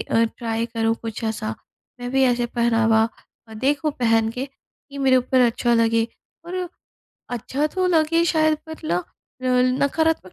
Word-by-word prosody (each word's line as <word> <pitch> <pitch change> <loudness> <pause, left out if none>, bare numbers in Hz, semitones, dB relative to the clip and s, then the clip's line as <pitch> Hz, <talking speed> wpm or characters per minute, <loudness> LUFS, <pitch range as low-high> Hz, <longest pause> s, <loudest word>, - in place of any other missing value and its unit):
अ, 230 0 +2
try 230 -1 -2
करूँ 225 -1 0
कुछ 225 0 -5
ऐसा। 220 0 -2 0.5
मैं 245 0 -4
भी 265 0 +2
ऐसे 245 -1 +2
पहनावा 225 -2 +2 0.4
अ, 220 - -11
देखूँ 285 +6 0
पहन 225 -2 +3
के 255 +3 -4 0.4
कि 280 - -8
मेरे 265 -1 +4
ऊपर 255 +1 +2
अच्छा 240 0 +2
लगे 230 0 +3 0.4
और 360 +1 -4 0.6
अच्छा 260 +5 -1
तो 370 -1 +1
लगे 330 -1 +3
शायद 315 -2 +3
मतलब 315 - -5
पर - - -8
ला 175 +2 +1 0.6
रल 250 - +4 0.2
नकारात्मक 320 - +1
245 Hz, 165 wpm, -22 LUFS, 225-290 Hz, 0.6 s, मेरे